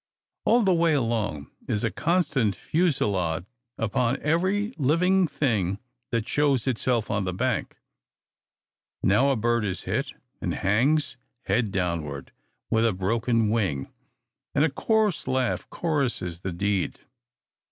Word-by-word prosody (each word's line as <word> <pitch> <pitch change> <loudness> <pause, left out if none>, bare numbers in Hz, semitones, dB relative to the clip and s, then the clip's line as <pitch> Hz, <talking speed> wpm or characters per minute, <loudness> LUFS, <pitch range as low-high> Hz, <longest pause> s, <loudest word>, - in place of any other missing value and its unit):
All 240 +2 +5
the 190 -2 +4
way 170 -1 +3
along 110 - -1 0.2
is 105 - -1
a 115 - +1
constant 150 - +1
fusillade 100 - 0 0.3
upon 115 +4 0
every 190 - +1
living 180 +6 +3
thing 105 - 0 0.3
that 115 -2 -1
shows 140 -5 +2
itself 125 -3 0
on 105 -1 0
the 95 - -2
bank. 125 +2 -1 1.3
Now 105 +9 +4
a 135 - +3
bird 120 0 +1
is 95 -3 -3
hit, - - -2 0.3
and - - -1
hangs, 125 +9 +1 0.3
head 115 -5 0
downward, 85 -7 -3 0.4
with 110 -1 +3
a 110 - +1
broken 115 +3 +1
wing; 95 -12 -1 0.6
and 145 +3 +4
a 155 - 0
coarse 215 +3 +1
laugh 130 -1 0
choruses 130 - -1
the 95 +1 -4
deed. 100 +1 -1
115 Hz, 130 wpm, -26 LUFS, 100-150 Hz, 1.3 s, All